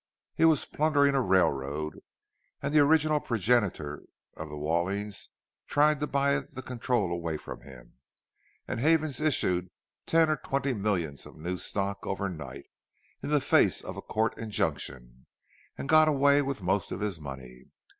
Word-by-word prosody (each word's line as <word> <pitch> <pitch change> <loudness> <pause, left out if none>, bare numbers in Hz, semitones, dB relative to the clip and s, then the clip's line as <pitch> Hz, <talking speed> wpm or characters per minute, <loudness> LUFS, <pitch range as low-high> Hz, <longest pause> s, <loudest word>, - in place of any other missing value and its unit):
He 165 - +3
was 160 -3 +4
plundering 145 -2 +2
a 135 - +2
railroad, 75 - 0 0.6
and - - -3
the 155 - +6
original 155 +1 +4
progenitor 105 - 0 0.3
of 80 0 -7
the 75 - -7
Wallings 90 +7 -2 0.4
tried 150 0 +3
to 150 - -1
buy 140 0 +2
the 130 -1 -10
control 120 -6 -1
away 85 -2 -2
from - - -9
him, 65 -2 -15 0.7
and - - -3
Havens 155 0 +2
issued 90 - +1 0.4
ten 165 0 +4
or 155 -1 +1
twenty 135 +1 -1
millions 95 - -2
of - - -15
new 90 +4 -3
stock 100 +1 -2
overnight, 80 -9 -4 0.6
in - - -5
the 150 -1 +3
face - - +3
of - - -6
a - - -6
court 110 +1 -1
injunction, 65 - -3 0.5
and - - -5
got 155 +1 +6
away 140 -1 +4
with 135 -7 -4
most 95 +2 0
of - - -4
his 100 -5 -2
money. 65 -3 -9
105 Hz, 155 wpm, -28 LUFS, -, 0.7 s, the